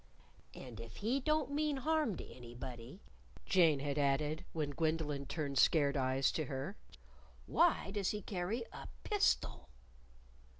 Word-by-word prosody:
"And 125 -4 -9
if 115 -3 -9
he 240 +6 0
don't 305 0 +1
mean 295 0 +1
harm 300 - +1
to - - -7
anybody," 120 - -9 0.4
Jane 165 -7 +4
had 145 +1 -1
added 145 +3 +1
when 150 -3 -2
Gwendolyn 150 -2 -1
turned 140 -2 -1
scared 145 -2 +4
eyes 130 0 +2
to 155 - -1
her, 135 +9 -4 0.7
"why 335 - +3
does 200 -2 0
he 210 -2 -3
carry 200 +6 -2
a - - -8 0.2
_pistol? 410 - +1
155 Hz, 135 wpm, -36 LUFS, 135-215 Hz, 0.7 s, Jane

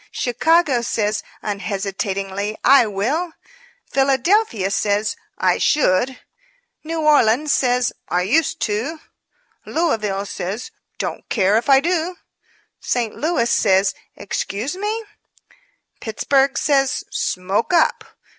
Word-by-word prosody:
Chicago 295 +1 +2
says, 215 -2 -1 0.2
unhesitatingly, 200 0 -3
'I 265 -2 +6
will;' 240 - -1
I - - -19 0.6
Philadelphia 270 - +2
says, 205 +1 0 0.2
'I - - +2
should;' 255 -2 +2 0.6
New 320 +1 -3
Orleans 295 -2 +3
says, 250 -1 +1 0.2
'I 180 +1 +1
used 280 - +1
to;' 235 +10 -2 0.6
Louisville 215 - -1
says, 200 - -5 0.3
'Don't - - -5
care 200 -2 +2
if 235 +5 0
I 270 -1 +6
do;' 345 +2 -1 0.6
St. 235 -3 -2
Louis 310 -6 0
says, 190 -1 +3 0.2
'Excuse 215 - -4
me;' 425 +3 -3 0.9
Pittsburg 270 +5 +1
says, 275 -2 +1
'Smoke 190 - -1
up.' 340 -2 +3
240 Hz, 105 wpm, -20 LUFS, 205-305 Hz, 0.9 s, I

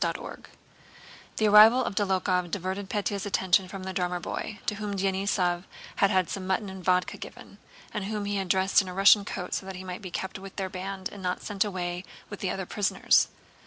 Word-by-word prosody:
CHAPTER - - -1
VIII - - -9 0.9
The 215 - +3
arrival 220 +4 +8
of - - -3
Dólokhov 185 -3 +1
diverted 190 +1 -3
Pétya's 205 -1 -2
attention 190 -1 +2
from 190 0 -7
the 190 0 -5
drummer 180 -1 -1
boy, 205 +4 -5
to - - 0
whom 205 -1 -4
Denísov 190 -2 0 0.3
had 200 - +4
had 185 -2 +2
some 190 -1 -5
mutton 190 +1 -1
and 190 -1 -9
vodka 180 0 +1
given, - - -11 0.3
and 205 - -3
whom 210 0 -3
he 205 0 -1
had - - 0
had 190 - -3
dressed 190 +3 +4
in 190 - -8
a 180 - -6
Russian 200 +1 +6
coat 180 -3 -5
so 190 - -3
that 190 - -6
he 185 - -7
might 185 +1 -6
be 190 - -7
kept 190 +2 -4
with 195 0 -10
their 190 -1 -3
band 190 0 -5
and 200 - -10
not 180 0 -2
sent 200 -2 0
away 180 -3 -3 0.3
with 205 - -6
the 190 - -2
other 190 +1 -3
prisoners. 205 +1 +3
190 Hz, 220 wpm, -27 LUFS, 185-200 Hz, 0.9 s, arrival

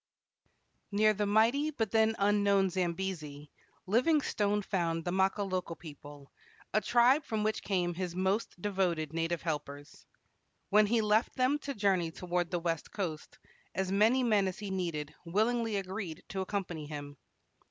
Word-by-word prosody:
Near 215 +1 +4
the 210 0 -1
mighty 230 +8 +3
but 225 -9 -2
then 220 0 +3
unknown 200 -1 +3
Zambesi, 170 -5 -3 0.3
Livingstone 210 - +2
found 165 -4 -1
the 175 - -1
Makololo 190 -2 0
people, 145 -3 -12 0.4
a 215 - +3
tribe 245 +6 +4
from 220 -5 -2
which 215 +1 0
came 180 -3 0
his 175 0 -4
most 190 +1 -1
devoted 175 -6 -1
native 165 0 -1
helpers. 145 -3 -5 0.6
When 210 +1 +5
he 230 +1 +2
left 215 +2 +2
them 260 +3 +2
to 280 -2 -5
journey 190 -5 +1
toward 175 +1 -2
the 180 - -1
west 165 -2 -3
coast, 165 -7 -5 0.4
as 190 0 -1
many 220 +6 +4
men 210 -5 +3
as 185 - -4
he 205 -2 -5
needed 165 -5 -3
willingly 220 +5 0
agreed 190 -4 -4
to 190 - -3
accompany 185 -6 -4
him. 145 -1 -7
190 Hz, 145 wpm, -31 LUFS, 170-215 Hz, 0.6 s, When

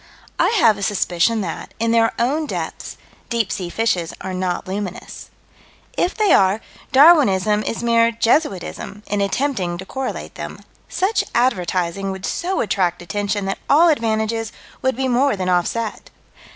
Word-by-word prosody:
I - - +4
have 215 - +4
a - - -7
suspicion 200 +2 +1
that, 170 -4 -6
in 230 0 +1
their 225 0 +3
own 290 +6 0
depths, - - -5 0.3
deep 230 -5 0
sea 180 -2 -3
fishes 185 -5 -1
are 190 - -5
not 185 -1 -2
luminous. 190 -1 -6 0.7
If 360 - 0
they 420 -6 +3
are, 195 +2 +4 0.3
Darwinism 230 - +5
is 230 - -4
mere 230 -1 +4
jesuitism, 225 - -1
in 205 0 -1
attempting 200 -4 -1
to 190 - -8
correlate 265 +5 -5
them. - - -8 0.3
Such 390 +4 +1
advertising 195 -5 0
would 190 0 -5
so 370 +3 -1
attract 180 -5 0
attention 205 +3 -2
that 195 - -3
all 330 +4 +6
advantages 225 -4 0 0.3
would 260 -1 +1
be 265 +1 -1
more 260 +2 +2
than 185 -1 -2
offset. 195 +5 -1
215 Hz, 150 wpm, -20 LUFS, 190-245 Hz, 0.7 s, all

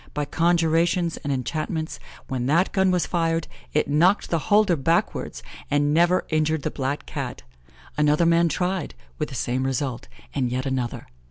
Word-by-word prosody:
By 150 0 0
conjurations 170 +1 +2
and 145 - -4
enchantments, 155 +5 -3 0.3
when 130 -2 -2
that 170 +6 +3
gun 190 -1 +2
was 180 -2 +2
fired, 165 -2 0 0.2
it 150 - +1
knocked 170 +8 +3
the 165 - +2
holder 205 -4 +5
backwards, 165 +4 -1 0.3
and 145 0 +2
never 175 +3 +3
injured 155 -1 +1
the - - -1
black 140 +1 -3
Cat. - - -5 0.6
Another 150 +3 +3
man 170 0 +4
tried, 180 - -2 0.2
with - - -2
the - - -8
same 125 +2 -1
result, 130 -1 -2 0.3
and 130 -3 0
yet 130 +2 -2
another. 130 -3 -2
155 Hz, 160 wpm, -24 LUFS, 140-170 Hz, 0.6 s, holder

